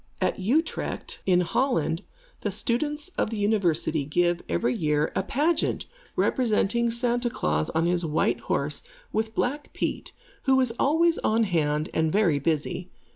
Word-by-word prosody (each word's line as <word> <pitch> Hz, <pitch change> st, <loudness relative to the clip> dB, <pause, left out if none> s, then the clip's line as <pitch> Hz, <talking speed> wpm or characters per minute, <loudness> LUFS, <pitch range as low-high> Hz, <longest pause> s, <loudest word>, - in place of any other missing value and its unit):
At -, -, 0 dB
Utrecht, 275 Hz, -, -1 dB
in 180 Hz, -1 st, +5 dB
Holland, 170 Hz, -, 0 dB, 0.4 s
the -, -, -2 dB
students 295 Hz, +7 st, -1 dB
of -, -, +1 dB
the 225 Hz, -, -4 dB
University 185 Hz, -7 st, +1 dB
give, 175 Hz, +4 st, +1 dB
every 85 Hz, +9 st, +1 dB
year, 150 Hz, +1 st, +1 dB
a -, -, +2 dB
pageant 300 Hz, -, 0 dB, 0.3 s
representing 235 Hz, -1 st, +2 dB
Santa 240 Hz, +1 st, 0 dB
Klaas 75 Hz, -, -1 dB
on 165 Hz, +1 st, +2 dB
his 175 Hz, 0 st, +2 dB
white 155 Hz, -1 st, +1 dB
horse, -, -, -1 dB, 0.3 s
with 220 Hz, 0 st, -1 dB
Black 290 Hz, +4 st, -1 dB
Pete, -, -, -3 dB, 0.3 s
who 265 Hz, -1 st, +4 dB
is 250 Hz, -3 st, +2 dB
always 325 Hz, +3 st, +3 dB
on 225 Hz, +1 st, +2 dB
hand 155 Hz, -5 st, 0 dB
and 160 Hz, -1 st, +1 dB
very 180 Hz, -7 st, +3 dB
busy. 160 Hz, +4 st, -1 dB
200 Hz, 145 wpm, -26 LUFS, 160-245 Hz, 0.4 s, in